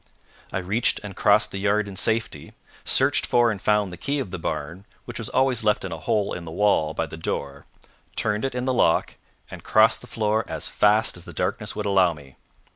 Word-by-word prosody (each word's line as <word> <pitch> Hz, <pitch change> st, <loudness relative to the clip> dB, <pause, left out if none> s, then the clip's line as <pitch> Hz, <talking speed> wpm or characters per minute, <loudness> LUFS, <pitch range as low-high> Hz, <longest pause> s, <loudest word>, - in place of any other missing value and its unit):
I -, -, -2 dB
reached 95 Hz, +6 st, 0 dB
and 100 Hz, -2 st, -8 dB
crossed 105 Hz, +2 st, +3 dB
the 100 Hz, -, -4 dB
yard 105 Hz, +1 st, +1 dB
in 100 Hz, -, -8 dB
safety, 110 Hz, +3 st, -2 dB, 0.3 s
searched -, -, +3 dB
for 120 Hz, -1 st, +3 dB
and 100 Hz, -3 st, -5 dB
found 105 Hz, -3 st, +2 dB
the 90 Hz, -, -8 dB
key 140 Hz, +1 st, -1 dB
of 130 Hz, -10 st, -4 dB
the 95 Hz, -, -5 dB
barn, 80 Hz, +5 st, -5 dB, 0.2 s
which 120 Hz, -, -6 dB
was 115 Hz, -, -4 dB
always 130 Hz, -3 st, +1 dB
left 105 Hz, -2 st, +1 dB
in 95 Hz, -, -5 dB
a 80 Hz, -, -5 dB
hole 100 Hz, +4 st, 0 dB
in 90 Hz, -, -6 dB
the 80 Hz, -, -8 dB
wall 80 Hz, -5 st, +1 dB
by -, -, -1 dB
the 80 Hz, -, -9 dB
door, 70 Hz, -3 st, -4 dB, 0.5 s
turned 105 Hz, -1 st, 0 dB
it 135 Hz, -2 st, -2 dB
in 125 Hz, 0 st, -2 dB
the 130 Hz, -, +1 dB
lock, 85 Hz, -9 st, +2 dB, 0.4 s
and -, -, -9 dB
crossed -, -, +4 dB
the -, -, -12 dB
floor 110 Hz, 0 st, 0 dB
as 80 Hz, -2 st, -3 dB
fast 105 Hz, -1 st, +2 dB
as 90 Hz, -, -11 dB
the 90 Hz, -, -10 dB
darkness -, -, -3 dB
would 105 Hz, -, -3 dB
allow 95 Hz, -4 st, +3 dB
me. 70 Hz, -3 st, -15 dB
100 Hz, 220 wpm, -24 LUFS, 90-110 Hz, 0.5 s, crossed